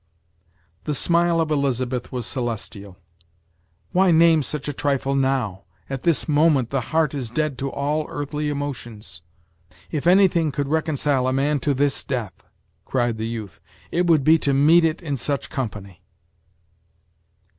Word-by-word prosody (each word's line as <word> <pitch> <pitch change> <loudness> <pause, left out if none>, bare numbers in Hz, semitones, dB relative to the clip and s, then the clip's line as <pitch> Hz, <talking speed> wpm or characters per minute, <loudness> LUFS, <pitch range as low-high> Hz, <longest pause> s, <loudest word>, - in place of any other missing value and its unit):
The 150 - -1
smile 170 +2 +2
of 160 -1 0
Elizabeth 130 -3 -1
was 125 -3 -4
celestial. 110 -6 -5 0.9
"Why 190 +1 +3
name 165 -1 +5
such 145 +2 -4
a 145 - -2
trifle 140 -1 -1
now? 130 -8 0 0.3
at 135 -2 -3
this 165 -4 +1
moment 150 -5 +3
the 135 -2 0
heart 160 -2 +1
is 130 -5 -4
dead 150 +3 -1
to 135 0 -3
all 150 +2 -1
earthly 150 +1 -3
emotions!" 120 - -6 0.7
"If 155 0 -2
anything 175 -4 +4
could 140 0 -3
reconcile 145 -4 +1
a 130 - +1
man 145 +2 +1
to 145 +1 0
this 140 +1 0
death," 115 - -5 0.4
cried 120 -3 -1
the 110 - -2
youth, 110 -5 -7 0.3
"it 175 +1 +1
would 160 -5 +4
be 160 +3 +5
to 140 -2 +1
meet 160 +5 +5
it 160 +2 -1
in 145 -4 -2
such 140 +3 -3
company!" 105 -7 -5
140 Hz, 150 wpm, -22 LUFS, 125-155 Hz, 0.9 s, name